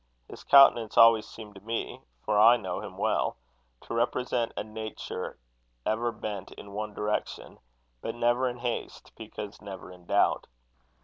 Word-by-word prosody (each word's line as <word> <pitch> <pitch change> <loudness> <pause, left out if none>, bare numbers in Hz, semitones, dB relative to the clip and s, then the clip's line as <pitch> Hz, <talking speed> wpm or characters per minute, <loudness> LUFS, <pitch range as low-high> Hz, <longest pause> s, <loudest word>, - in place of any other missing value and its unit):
His - - -11
countenance 130 -6 +6
always 115 -1 +7
seemed 105 -2 -11
to 95 - -13
me 115 +2 -4 0.2
(for 105 -1 +2
I 115 +3 +8
knew 95 -6 -4
him - - -9
well) - - 0 0.4
to - - -8
represent 120 0 0
a - - -1
nature 110 0 -6 0.5
ever 115 +2 0
bent 105 -3 -6
in 100 - -11
one 105 0 -5
direction, 105 0 -3 0.4
but 115 - -4
never 120 +2 +2
in 120 - -7
haste, 120 -1 -5
because 105 -1 -8
never 95 -3 -9
in 90 -1 -16
doubt. - - +2
110 Hz, 150 wpm, -28 LUFS, 105-120 Hz, 0.5 s, I